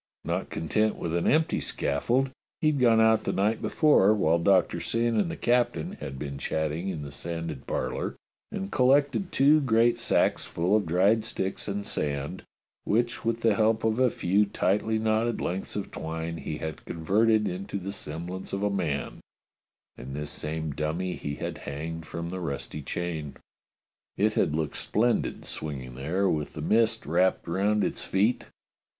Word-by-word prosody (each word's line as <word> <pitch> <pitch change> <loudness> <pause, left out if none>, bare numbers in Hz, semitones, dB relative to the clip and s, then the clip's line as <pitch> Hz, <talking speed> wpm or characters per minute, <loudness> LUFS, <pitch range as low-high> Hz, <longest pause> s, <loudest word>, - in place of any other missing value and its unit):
Not - - -2
content 105 +6 0
with 80 - -4
an 85 - +1
empty 155 +2 +2
scaffold, 120 - 0 0.3
he 155 - +3
had 145 - -1
gone 115 -3 +5
out 110 -1 +4
the - - 0
night 105 +3 +1
before, 110 -10 +4
while 85 -4 +3
Doctor 95 +2 +3
Syn 115 0 0
and 110 +9 +2
the 165 - -5
captain 120 -10 +1
had 65 - -6
been 70 -1 -5
chatting 80 +5 -2
in 80 -6 -4
the 70 - -7
sanded 80 -2 -5
parlour, - - -2 0.4
and 95 +1 -4
collected 140 +6 +3
two 150 +3 +5
great 120 -2 +3
sacks 115 - +2
full 90 +5 0
of 105 -5 +1
dried 100 +7 +3
sticks 95 -4 -3
and 100 0 -3
sand, 75 +4 -2 0.4
which, 120 +2 0
with 115 0 -1
the 115 -2 +4
help 110 +1 +2
of 110 +1 +1
a 130 -1 +5
few 100 0 +2
tightly 105 +2 +1
knotted 110 +1 +1
lengths 95 +2 -3
of 105 - -4
twine, 80 +1 -4
he 75 -1 -5
had 80 -3 -6
converted 105 +6 +2
into 95 +2 -4
the 100 +1 -5
semblance 90 0 -6
of 100 +1 -1
a 105 - +2
man, 80 -9 -2 0.8
and 65 +2 -7
this 75 0 -3
same 80 0 -3
dummy 80 +6 -2
he 70 0 -4
had - - -5
hanged 80 +3 -6
from 85 0 -5
the 95 +1 -4
rusty 75 -2 -4
chain. 80 -1 -4 0.8
It 105 +1 +2
had 75 - +1
looked 80 -2 -2
splendid 120 +3 0
swinging 65 -5 -5
there 80 +10 0
with 75 -5 -1
the - - -6
mist 115 0 +2
wrapped 90 +4 +2
round 100 +5 +1
its - - -2
feet. 105 +6 +1
95 Hz, 170 wpm, -27 LUFS, 80-110 Hz, 0.8 s, gone